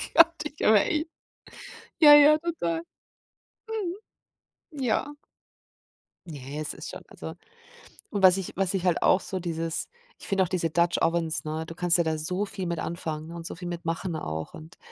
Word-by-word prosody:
Gott, 335 0 +7
ich 300 0 -7
habe 210 -2 +6
echt 315 -1 -1 0.9
Ja, 295 -2 +9
ja, 295 +1 +7
total. 170 - -2 1.9
Mhm. 280 -3 -6
Ja. 260 +5 0 1.1
Ne, 145 -1 -7
es 150 - -4
ist - - -8
schon, - - -9
also 80 0 -8 0.8
Und 200 - -2
was 185 0 +7
ich 190 - -5
was 195 0 0
ich 185 -1 -2
halt 175 - +2
auch 185 - +5
so 190 - -4
dieses 165 -2 -3 0.3
Ich - - -11
finde 195 -2 +2
auch - - -2
diese 170 -3 0
Dutch 170 +2 +2
Ovens, 165 -1 0
ne, 155 +1 -4
du 165 - -8
kannst 175 0 +2
ja 170 - +3
da 160 -1 -1
so 180 +6 -1
viel 190 -3 -5
mit 170 -1 -2
anfangen, 160 -1 -5
und 170 -1 -8
so - - -7
viel 175 0 -7
mit 175 0 -5
machen 165 +1 -3
auch. 80 - -5
Und, 160 +2 -12
175 Hz, 180 wpm, -27 LUFS, 160-195 Hz, 1.9 s, Ja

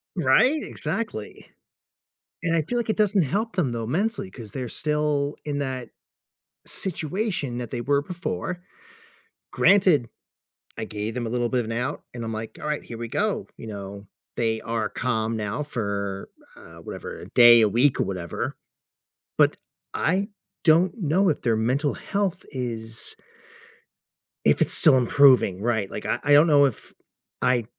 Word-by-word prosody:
Right, 190 - +4
exactly. 215 - -5 1.0
And 165 -2 +1
I 165 - +3
feel 240 +11 -3
like 235 -1 -2
it 220 - 0
doesn't 205 -3 +3
help 205 - -2
them, 160 -9 +1
though, 115 -1 -3
mentally, 195 - -1
'cause 115 - -10
they're 125 0 -5
still 150 0 0
in 145 -1 -2
that 130 -4 -4 0.8
situation 180 - -2
that 120 -2 -5
they 120 - -3
were 140 +3 +1
before. 180 +1 -4 0.9
Granted, 185 -11 +4 0.7
I 110 - -3
gave 105 +1 -4
them 120 0 -3
a - - -3
little 120 0 0
bit 125 - +1
of 120 - -2
an 110 - -5
out 125 +6 -3
and 120 -1 -6
I'm 115 0 -4
like, 110 +1 -6
"Alright, 150 -1 -3
here 115 - -8
we 120 - -4
go." 210 - -1
You - - -9
know, 100 -1 -8 0.3
they 115 -1 0
are 115 -2 -2
calm 115 -2 -1
now 110 +6 -3
for, 100 -7 -4 0.3
uh, - - -14
whatever, - - -7
a - - -11
day, 120 -1 +8
a 110 - +4
week 125 +6 +3
or - - +3
whatever, 90 -3 -4 0.8
but - - +4 0.4
I 190 +4 +1 0.4
don't 170 +3 +4
know 185 +2 +2
if 150 - -2
their 115 -3 +2
mental 130 +6 0
health 195 -3 -2
is 115 -4 -3 1.3
if - - +4
it's - - +2
still 130 - +7
improving, 125 -6 +4
right. 110 -4 0
Like, - - -7
I - - 0
I 145 - +3
don't 150 +3 +7
know 145 -2 +6
if 130 -6 -4 0.5
I 125 -2 +2
130 Hz, 160 wpm, -24 LUFS, 115-165 Hz, 1.3 s, day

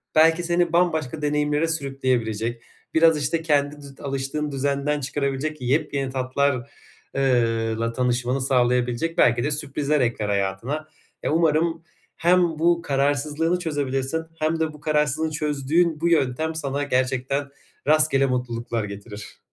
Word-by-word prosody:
belki 165 +2 +5
seni 175 0 +1
bambaşka 160 -4 +1
deneyimlere 150 +1 +1
sürükleyebilecek, 125 -7 -1 0.3
biraz, 160 -1 +5
işte, 165 +4 0
kendi 145 -2 +1
dü 140 -1 -13
alıştığın 140 +2 -3
düzenden 140 +2 0
çıkarabilecek 140 +1 -2
yepyeni 135 +1 0
tatlar 130 -1 -1 0.4
eee, 115 -4 +1
la 115 0 -1
tanışmanı 125 +1 0
sağlayabilecek 125 +4 +1
belki 120 0 +4
de 150 - 0
sürprizler 145 0 0
ekler 115 -4 0
hayatına. 100 +10 -2 0.4
E, - - 0
umarım 165 +1 +2 0.3
hem 180 +2 +4
bu 170 0 +2
kararsızlığını 145 +4 0
çözebilirsin 145 -1 -2
hem 160 +1 0
de 160 -1 -1
bu 150 - -14
kararsızlığı 150 0 +1
çözdüğün 150 +2 0
bu 170 - +2
yöntem 160 0 +1
sana 145 -2 -2
gerçekten 130 +1 0 0.4
rastgele 150 -3 +4
mutluluklar 120 -3 -2
getirir. 105 +1 -9
140 Hz, 125 wpm, -23 LUFS, 125-155 Hz, 0.4 s, belki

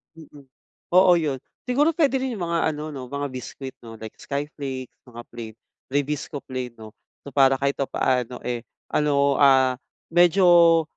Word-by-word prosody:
Mm. 150 -3 -14 0.5
Oo 180 0 +6
yun 150 -6 -1 0.2
siguro 290 +6 +2
puwede 280 -5 +2
rin 260 -2 -3
yung 190 - -4
mga 165 -1 +1
ano 155 +1 -6
'no, 130 -3 -7
mga 140 +1 -4
biskwit 130 +1 -7
'no, 115 -1 -11
like 110 0 -9
skyflake, 140 -3 -5 0.2
mga 120 -1 -9
plain 115 -2 -8 0.3
rebisco 145 0 -3
plain 130 -2 -5
'no, 110 -1 -11 0.3
so 140 - -10
para 135 0 +4
kahit 140 0 0
papaano, 125 -2 -1
eh, 120 -1 -2 0.3
ano, 140 -2 +2
ah, 130 -2 +5 0.4
medyo 175 -1 +5
140 Hz, 155 wpm, -24 LUFS, 130-165 Hz, 0.5 s, Oo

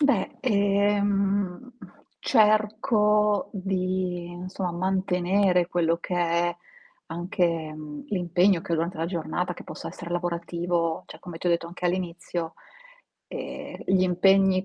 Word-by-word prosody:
Beh, 280 -10 +2
ehm, 200 +1 +1 0.5
cerco 210 -2 +3
di, 185 -2 -2
non 180 +1 -6
so, 190 0 -5
mantenere 185 0 +2
quello 170 -2 +1
che 180 - -4
è 175 0 +1 0.5
anche, 170 -1 -1
mhmm, 150 -1 -8
l'impegno 180 -1 +2
che - - -4
ho - - +5
durante 170 +3 -1
la 165 - 0
giornata, 175 +1 -2
che - - -10
possa - - -8
essere 170 - -8
lavorativo, 170 -1 -1
cioè - - -12
come 175 -3 -8
ti 180 - -5
ho - - +4
detto 170 0 0
anche 180 +1 -9
all'inizio, 175 -2 -3 0.7
ehm, - - -7
gli 185 0 +4
impegni, 185 +1 +4
180 Hz, 130 wpm, -26 LUFS, 170-195 Hz, 0.7 s, ho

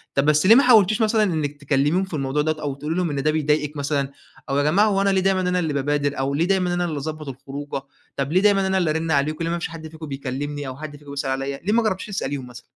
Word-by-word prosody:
طَب 140 +1 +2
بس 150 +3 +3
ليه 225 +4 +8
ما 275 - +6
حاولتيش 220 -3 +5
مثلًا 220 0 +3
إنك 155 -7 -1
تكلميهم 145 +6 +1
في 190 - -8
الموضوع 140 0 0
دوّة 155 0 -1
أو 140 -2 -3
تقولي 150 +4 -4
لهم 180 -3 0
إن 140 -2 -2
ده 155 - +3
بيضايقِك 150 -1 0
مثلًا، 140 -1 -1 0.4
أو 135 - 0
يا 145 - +2
جماعة 195 +9 +4
هوأنا 200 -1 +2
ليه 190 -1 +2
دايمًا 190 0 +2
أنا 180 0 +1
اللي 160 -4 -1
بابادر، 145 0 0
أو 135 +1 0
ليه 160 +4 +1
دايمًا 180 -2 +1
أنا 175 0 0
اللي 155 -3 -3
أضبط 155 +1 -5
الخروجة، 140 +1 -6 0.4
طَب 140 +2 -1
ليه 185 - +4
دايمًا 195 -2 +3
أنا 190 0 +1
اللي 175 -4 +1
أرن 160 +1 -1
عليكم 155 +3 +1
ليه 165 - -1
ما 170 - -1
فيش - - -3
حد 160 -1 -8
فيكم 160 0 -9
بيكلمني، 140 +1 -4
أو 130 +1 -6
حد 150 -1 -8
فيكم 145 -1 -12
بيسأل 140 -1 -3
عليّا 135 +1 -2
ليه 210 - +1
ما 235 0 +3
جربتيش 190 -2 -1
تسأليهم 140 -10 -4
مثلًا؟ 120 -1 -12
155 Hz, 265 wpm, -22 LUFS, 140-180 Hz, 0.4 s, ليه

